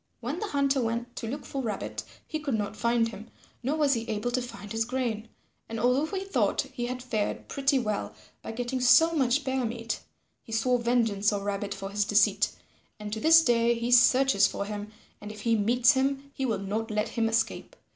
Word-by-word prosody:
When 255 Hz, +8 st, -4 dB
the 430 Hz, -, -3 dB
Hunter 280 Hz, -4 st, +1 dB
went 235 Hz, +1 st, -3 dB
to 230 Hz, -, -4 dB
look 280 Hz, +5 st, -5 dB
for 275 Hz, -, -4 dB
Rabbit, 215 Hz, -5 st, -4 dB, 0.2 s
he 310 Hz, -, -4 dB
could 285 Hz, -6 st, -2 dB
not 210 Hz, -1 st, -3 dB
find 235 Hz, 0 st, +1 dB
him, 220 Hz, +1 st, -10 dB, 0.3 s
nor 270 Hz, +5 st, -1 dB
was 290 Hz, -3 st, +3 dB
he 230 Hz, -, 0 dB
able 215 Hz, +3 st, -2 dB
to 255 Hz, +1 st, 0 dB
find 210 Hz, -4 st, -9 dB
his 225 Hz, 0 st, 0 dB
grain. 235 Hz, -2 st, -3 dB, 0.4 s
And 225 Hz, 0 st, -4 dB
although 250 Hz, +6 st, +2 dB
he 380 Hz, -, -4 dB
thought 390 Hz, -, +1 dB
he 240 Hz, 0 st, -3 dB
had 250 Hz, 0 st, -5 dB
fared 220 Hz, -5 st, -2 dB
pretty 275 Hz, 0 st, +1 dB
well 215 Hz, -5 st, -2 dB, 0.3 s
by -, -, -6 dB
getting 245 Hz, +2 st, -3 dB
so 325 Hz, +7 st, +6 dB
much 275 Hz, -1 st, +2 dB
bear 260 Hz, -1 st, -1 dB
meat, 230 Hz, 0 st, -3 dB, 0.4 s
he -, -, -14 dB
swore 245 Hz, +2 st, +2 dB
vengeance 225 Hz, -4 st, +1 dB
on 200 Hz, -1 st, -2 dB
Rabbit 200 Hz, 0 st, -3 dB
for 195 Hz, 0 st, -6 dB
his 205 Hz, +1 st, +1 dB
deceit, 205 Hz, 0 st, +3 dB, 0.5 s
and 210 Hz, 0 st, -6 dB
to 220 Hz, -, -3 dB
this 325 Hz, +5 st, +7 dB
day 235 Hz, -3 st, +3 dB
he 235 Hz, +1 st, -2 dB
searches 250 Hz, -4 st, +5 dB
for 200 Hz, -, -4 dB
him, 210 Hz, 0 st, -6 dB, 0.3 s
and 210 Hz, 0 st, -7 dB
if 210 Hz, -1 st, -10 dB
he 230 Hz, +1 st, +2 dB
meets 240 Hz, +5 st, +4 dB
him, 275 Hz, 0 st, -1 dB
he 265 Hz, -2 st, -2 dB
will 220 Hz, -4 st, 0 dB
not 210 Hz, +4 st, -3 dB
let 210 Hz, 0 st, -1 dB
him 225 Hz, -1 st, 0 dB
escape. 230 Hz, -, -1 dB
235 Hz, 210 wpm, -28 LUFS, 215-265 Hz, 0.5 s, this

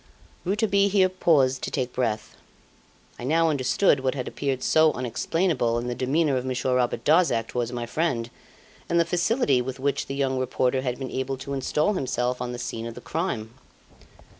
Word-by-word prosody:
'" -, -, -29 dB
Rouletabille 200 Hz, +1 st, +2 dB
here 190 Hz, -2 st, +4 dB
paused 140 Hz, -8 st, +2 dB
to -, -, -3 dB
take 130 Hz, -2 st, -2 dB
breath. 110 Hz, -4 st, -2 dB, 0.8 s
I -, -, -7 dB
now 160 Hz, +4 st, +3 dB
understood 140 Hz, +3 st, +2 dB
what 130 Hz, 0 st, -1 dB
had 130 Hz, -3 st, -4 dB
appeared 135 Hz, -2 st, -2 dB
so 155 Hz, 0 st, +4 dB
unexplainable 130 Hz, 0 st, 0 dB
in 120 Hz, -, -3 dB
the -, -, -1 dB
demeanour 135 Hz, +3 st, +1 dB
of 125 Hz, -, -2 dB
Monsieur 130 Hz, 0 st, -1 dB
Robert 125 Hz, -1 st, 0 dB
Darzac 155 Hz, -8 st, +3 dB
towards 120 Hz, -1 st, -2 dB
my 120 Hz, -1 st, -3 dB
friend, 120 Hz, -4 st, -1 dB, 0.6 s
and 170 Hz, -, +3 dB
the 170 Hz, -, +4 dB
facility 175 Hz, -, +2 dB
with 130 Hz, +1 st, -5 dB
which 140 Hz, +1 st, -1 dB
the 135 Hz, -, -4 dB
young 135 Hz, -2 st, 0 dB
reporter 130 Hz, 0 st, 0 dB
had 125 Hz, -2 st, -2 dB
been 135 Hz, -2 st, -6 dB
able 130 Hz, +1 st, -2 dB
to 135 Hz, +2 st, -6 dB
install 150 Hz, +7 st, +1 dB
himself 125 Hz, -6 st, -1 dB
on 125 Hz, 0 st, -3 dB
the 120 Hz, -, -5 dB
scene 115 Hz, -1 st, -5 dB
of 115 Hz, -, -8 dB
the -, -, -8 dB
crime. 120 Hz, -8 st, -3 dB
130 Hz, 190 wpm, -25 LUFS, 125-160 Hz, 0.8 s, here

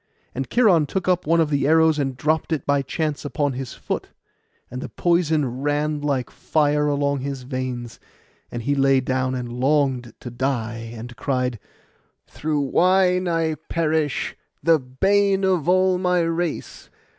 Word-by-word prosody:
Then 135 Hz, -, -3 dB
Cheiron 190 Hz, -11 st, +4 dB
took 185 Hz, +2 st, -3 dB
up 180 Hz, -3 st, +1 dB
one 165 Hz, +1 st, +3 dB
of 155 Hz, -2 st, +2 dB
the 140 Hz, -1 st, +1 dB
arrows, 160 Hz, 0 st, +4 dB
and 135 Hz, -3 st, -2 dB
dropped 155 Hz, +4 st, 0 dB
it 160 Hz, -, -1 dB
by 140 Hz, 0 st, +2 dB
chance 150 Hz, +2 st, -3 dB
upon 145 Hz, -1 st, -1 dB
his 130 Hz, -1 st, -6 dB
foot; -, -, -4 dB, 0.6 s
and 125 Hz, +1 st, -5 dB
the -, -, -6 dB
poison 155 Hz, -7 st, +1 dB
ran 145 Hz, +1 st, 0 dB
like 140 Hz, -4 st, -1 dB
fire 150 Hz, -1 st, +1 dB
along 140 Hz, -1 st, 0 dB
his 135 Hz, -1 st, -5 dB
veins, 125 Hz, -2 st, -5 dB, 0.5 s
and 120 Hz, -1 st, -5 dB
he 140 Hz, -, +1 dB
lay 135 Hz, -1 st, +3 dB
down 130 Hz, 0 st, -1 dB
and 120 Hz, -2 st, -5 dB
longed 130 Hz, -4 st, +1 dB
to 120 Hz, -, -7 dB
die; 115 Hz, -3 st, -3 dB
and 120 Hz, +2 st, -8 dB
cried, 125 Hz, -4 st, -1 dB, 0.7 s
'Through 150 Hz, -1 st, -2 dB
wine 180 Hz, +5 st, +3 dB
I 165 Hz, -2 st, +1 dB, 0.2 s
perish, 155 Hz, -3 st, 0 dB, 0.3 s
the 165 Hz, -1 st, +5 dB
bane 195 Hz, +10 st, +1 dB
of 180 Hz, -4 st, +1 dB
all 185 Hz, 0 st, +3 dB
my 180 Hz, -1 st, +2 dB
race. 165 Hz, 0 st, -3 dB
145 Hz, 155 wpm, -22 LUFS, 130-165 Hz, 0.7 s, the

